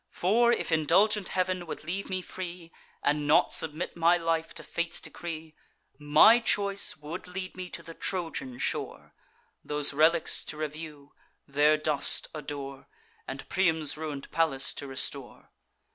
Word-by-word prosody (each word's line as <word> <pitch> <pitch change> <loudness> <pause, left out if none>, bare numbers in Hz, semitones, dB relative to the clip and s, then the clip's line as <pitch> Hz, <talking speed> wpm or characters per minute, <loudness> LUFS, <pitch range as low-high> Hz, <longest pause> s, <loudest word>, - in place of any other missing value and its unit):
For, 235 +6 +3
if 235 - 0
indulgent 185 +6 +3
Heav'n 185 -1 -1
would - - -6
leave 185 +5 -4
me 185 -1 -2
free, 175 -2 -7 0.3
And 150 0 +1
not 150 - +4
submit 160 +1 -2
my 170 +1 +4
life 165 -1 -1
to - - -5
fate's 170 0 -2
decree, 160 -2 -7 0.5
My 150 +11 +7
choice 200 -3 +1
would 155 +5 -7
lead 185 0 -6
me 185 -1 -6
to 170 - -6
the 165 - -9
Trojan 165 -9 -3
shore, - - -3 0.5
Those 150 -1 +1
relics 160 +3 +3
to 150 - -6
review, 150 -1 -7 0.3
their 150 +2 +4
dust 150 -2 +1
adore, 140 -3 -7 0.4
And - - -6
Priam's 160 -5 +2
ruin'd 150 -3 -6
palace 155 -5 +1
to 140 - -5
restore. 135 -1 -4
160 Hz, 145 wpm, -29 LUFS, 150-180 Hz, 0.5 s, My